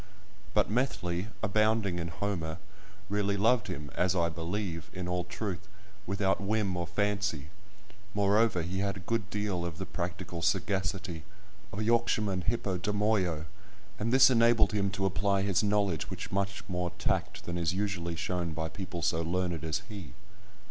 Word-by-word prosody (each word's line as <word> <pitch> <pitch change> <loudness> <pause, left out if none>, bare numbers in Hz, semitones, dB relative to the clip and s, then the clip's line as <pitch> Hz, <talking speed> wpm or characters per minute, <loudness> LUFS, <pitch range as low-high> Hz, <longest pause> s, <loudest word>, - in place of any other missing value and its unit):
But 105 - +4
Methley, 100 -6 0 0.2
abounding 110 -3 +2
in 85 - -2
Homer, 85 -3 -2 0.5
really 100 +1 +1
loved 110 +2 +3
him 75 +1 -5
(as 90 +1 +2
I 85 -2 +3
believe) 85 +1 -3
in 90 -1 -4
all 90 0 -1
truth, 95 +1 -4 0.4
without 95 +1 +1
whim 100 -2 +1
or 85 -1 -2
fancy; 100 -7 0 0.7
moreover, 100 -2 +3
he 90 +3 -2
had 100 0 0
a - - -8
good 105 +2 -1
deal 105 -5 -1
of 85 -2 -4
the 95 - -4
practical 85 -1 -4
sagacity 95 -2 0 0.5
"Of - - -7
a 110 - 0
Yorkshireman 110 -5 +2
hippodamoio," 100 -5 +1 0.5
and 115 +2 0
this 130 0 +8
enabled 115 -2 +5
him 100 -2 +1
to 95 0 -1
apply 100 +1 +2
his 100 -2 +2
knowledge 100 -7 +1
with - - -6
much 100 0 -1
more 90 -2 -1
tact - - -1
than 85 - -3
is 85 0 0
usually 95 -4 -1
shown 85 0 -2
by 80 0 -2
people 90 -3 -5
so 80 +2 +2
learned 85 -1 -1
as 80 +5 -1
he. 95 - -8
95 Hz, 155 wpm, -31 LUFS, 85-105 Hz, 0.7 s, this